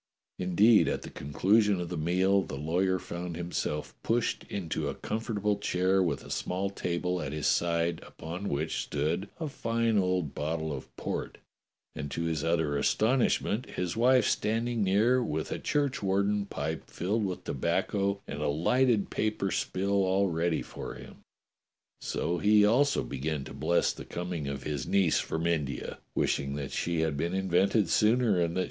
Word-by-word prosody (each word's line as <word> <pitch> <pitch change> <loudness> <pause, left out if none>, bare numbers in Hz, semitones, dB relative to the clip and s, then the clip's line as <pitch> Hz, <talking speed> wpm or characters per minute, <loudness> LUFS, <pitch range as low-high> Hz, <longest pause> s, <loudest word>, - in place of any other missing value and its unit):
Indeed 100 +5 +5
at - - -1
the - - -8
conclusion 100 +8 +2
of 90 -1 -4
the - - -3
meal 95 +5 +2
the 70 - -6
lawyer 90 +6 +1
found 85 -1 -6
himself 85 -3 -3
pushed 115 +1 0
into 90 -6 -3
a - - -4
comfort 110 0 -3
able 105 0 +1
chair 95 0 +2
with 85 -6 -1
a - - -9
small 95 +2 -2
table 90 -1 -2
at 70 -1 -4
his 75 -2 -3
side 85 -1 +1
upon 90 +5 -6
which 75 +3 -1
stood 75 +7 -2
a 160 - -2
fine 115 -5 0
old 90 -5 0
bottle 80 0 -2
of 65 - -7
port, - - -4 0.6
and 70 - -4
to 85 - -3
his 80 -3 -1
utter 80 -3 +1
astonishment 115 - +1
his 90 -2 -3
wife 125 0 +4
standing 115 +1 0
near 110 +7 +3
with 80 -8 -3
a - - -2
churchwarden 105 -8 0
pipe 80 -2 -4
filled 105 +5 -1
with 95 -3 -3
tobacco 95 +7 0
and - - -5
a - - 0
lighted 110 - +2
paper 105 -3 -1
spill 100 +1 0
all 95 +1 +2
ready 80 0 0
for - - -7
him. - - -11 0.8
So 85 0 -1
he 105 0 +5
also 135 +7 +3
began 70 +1 -3
to - - -9
bless 80 +5 +1
the - - -9
coming 85 -4 -4
of 70 -1 -4
his 75 -3 -3
niece 95 -5 +3
from 80 +1 -2
India, 75 -5 -2 0.2
wishing 70 0 0
that 70 -1 -4
she 85 -2 -1
had 80 -3 0
been 85 +5 -1
invented 95 +2 +2
sooner 110 -1 +3
and 85 +1 0
that - - +2
90 Hz, 165 wpm, -29 LUFS, 80-105 Hz, 0.8 s, Indeed